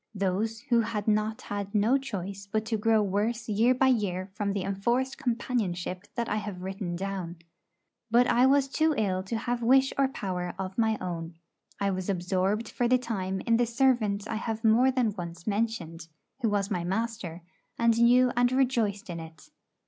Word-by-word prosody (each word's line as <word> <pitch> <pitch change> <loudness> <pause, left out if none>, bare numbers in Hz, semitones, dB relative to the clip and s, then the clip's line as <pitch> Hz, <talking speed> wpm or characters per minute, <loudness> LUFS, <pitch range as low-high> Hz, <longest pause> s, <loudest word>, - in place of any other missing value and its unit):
Those 205 +4 -1
who 240 -1 +2
had 215 -2 -3
not 215 +1 +1
had 200 0 -5
no 215 +5 +4
choice 200 -6 -4
but 215 0 0
to 225 - -1
grow 220 0 +3
worse 215 +4 -1
year 230 +4 +3
by 265 +1 +3
year 190 -6 0
from 205 -1 -2
the 195 -2 -2
enforced 235 +8 -1
companionship 205 -7 -2
that 235 -1 -1
I 210 - -1
have 200 -3 -5
written 190 -2 -4
down. 185 -2 -4 0.7
But 240 +2 +5
I 245 +2 +4
was 275 0 +4
too 310 +2 +1
ill 190 -4 0
to 195 +5 -3
have 240 +1 -2
wish 265 +3 +4
or 275 - +4
power 180 -8 -4
of 190 0 -5
my 220 -2 +2
own. 170 -2 -5 0.4
I 200 0 +1
was 185 0 -3
absorbed 190 +4 0
for 245 - -1
the 255 +1 +4
time 190 -6 -3
in 230 -1 +2
the 240 0 +2
servant 230 -4 +1
I 220 - -2
have 225 0 -4
more 230 +4 +5
than 250 -5 +1
once 170 -2 -7
mentioned, 200 -7 -2 0.3
who 235 -4 +1
was 205 0 0
my 180 -3 -1
master, 190 -3 -3 0.3
and 230 -1 +3
knew 245 +1 +5
and 245 +1 +3
rejoiced 240 -6 +1
in 170 -2 -5
it. 160 -2 -12
215 Hz, 185 wpm, -28 LUFS, 190-235 Hz, 0.7 s, But